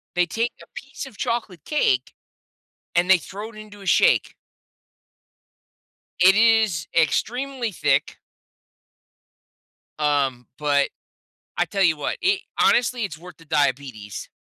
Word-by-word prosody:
They 180 0 +3
take 230 +6 -2
a - - -12
piece 275 +2 -8
of 265 -6 -13
chocolate 230 - -3
cake, 130 - +1 0.8
and 175 +2 +2
they 190 - +7
throw 205 +7 -8
it - - -18
into 210 -1 -12
a - - -11
shake. - - +3 1.9
It 185 +2 +7
is 220 -6 +3
extremely 245 - 0
thick 145 -6 0 1.8
um, 140 -4 0
but, 145 -1 +2 0.7
I - - +2
tell 195 -1 0
you 165 -4 +3
what, 145 - -3
it 380 +2 +2 0.2
honestly, 245 0 +3
it's 160 -7 -4
worth 180 +1 -13
the 165 - -18
diabetes. 135 -8 -2
185 Hz, 125 wpm, -23 LUFS, 150-230 Hz, 1.9 s, they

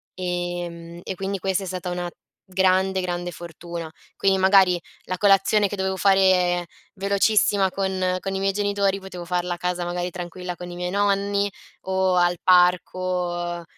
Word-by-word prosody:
Ehm, 175 -1 -4
e - - -4
quindi 195 +2 -3
questa 190 +1 -1
è - - -5
stata 180 0 -4
una 175 0 -3 0.4
grande, 190 0 +2
grande 175 -1 -3
fortuna. 170 0 -8 0.3
Quindi 195 -1 +3
magari 190 -2 +5 0.2
la 185 - -4
colazione 200 +1 +4
che 205 - -4
dovevo 190 0 -1
fare 185 -2 +3 0.3
velocissima 200 0 +2
con 185 -1 -1
con 195 +1 -4
i - - -1
miei 195 0 +1
genitori 200 -1 0
potevo 190 -2 -8
farla 180 0 -1
a - - -6
casa 180 0 -2
magari 175 +1 -2
tranquilla 180 0 -6
con 180 0 -8
i 175 - -8
miei 180 0 -3
nonni, 200 0 +1 0.4
o 190 -1 +1
al 175 0 +3
parco; 180 -1 +2
185 Hz, 155 wpm, -23 LUFS, 175-195 Hz, 0.4 s, magari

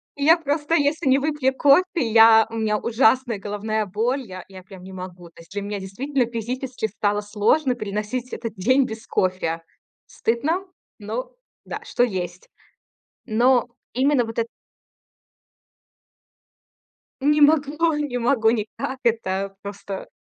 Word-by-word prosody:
И 285 - -4
я 325 +3 +7
просто, 295 0 -1
если 295 +1 +1
не 265 +1 +5
выпью 285 -2 0
кофе, 285 +6 +5
я 225 -5 +6
у 225 - -8
меня 215 -1 0
ужасная 235 0 +2
головная 210 +2 -2
боль, 230 +8 -1
я 185 -3 -9
я 190 -2 -12
прям 190 -1 -13
не 190 +1 -10
могу. 180 -2 -9
То 165 - -16
есть 165 - -19
для 205 - -3
меня 205 0 -4
действительно 250 +8 -1
физически 245 +1 -3
стало 205 0 -1
сложно 220 +7 +1
переносить 215 +3 -4
этот 230 -2 -5
день 255 +8 +3
без 220 -2 -8
кофе. 180 -3 -1 0.4
Стыдно, 310 +12 -1 0.3
но - - -5 0.3
да, - - -5
что 245 - +1
есть. 185 -6 -3 0.8
Но 245 +2 +3 0.3
именно 265 0 +3
вот 225 0 -7
это 230 0 0 2.7
Не 295 +2 +3
могу 305 +2 +3
не 290 -4 -2
могу 235 -2 +3
никак 230 +4 -3
это 195 -4 0
просто. 200 -1 -7
230 Hz, 140 wpm, -23 LUFS, 205-275 Hz, 2.7 s, я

